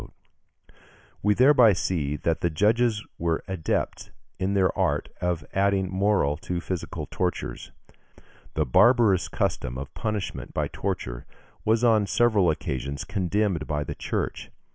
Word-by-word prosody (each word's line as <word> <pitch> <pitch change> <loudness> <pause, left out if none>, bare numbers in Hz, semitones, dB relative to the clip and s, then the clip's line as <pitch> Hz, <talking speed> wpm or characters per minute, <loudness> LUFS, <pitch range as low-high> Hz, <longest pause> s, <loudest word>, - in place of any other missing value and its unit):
We 105 +1 +3
thereby 125 -4 +6
see 80 -5 -1
that 80 +2 -1
the 85 - +2
judges 110 +6 +2
were 85 -1 0
adepts 95 -5 -2 0.3
in 95 +1 0
the 95 -2 +3
art - - 0
of 85 -4 -1
adding 95 -1 +1
moral 95 -7 +1
to 90 0 -4
physical 90 0 -4
tortures. 90 -1 -3 0.8
The 75 - +1
barbarous 110 - +4
custom 60 0 -2
of 70 +1 -7
punishment 105 -4 -4
by - - 0
torture - - -4 0.4
was 110 +2 +2
on 110 -4 +4
several 110 -5 +3
occasions 70 -2 -3
condemned 100 -3 -1
by 75 -2 -1
the - - -5
Church. - - -3
95 Hz, 130 wpm, -26 LUFS, 80-105 Hz, 0.8 s, thereby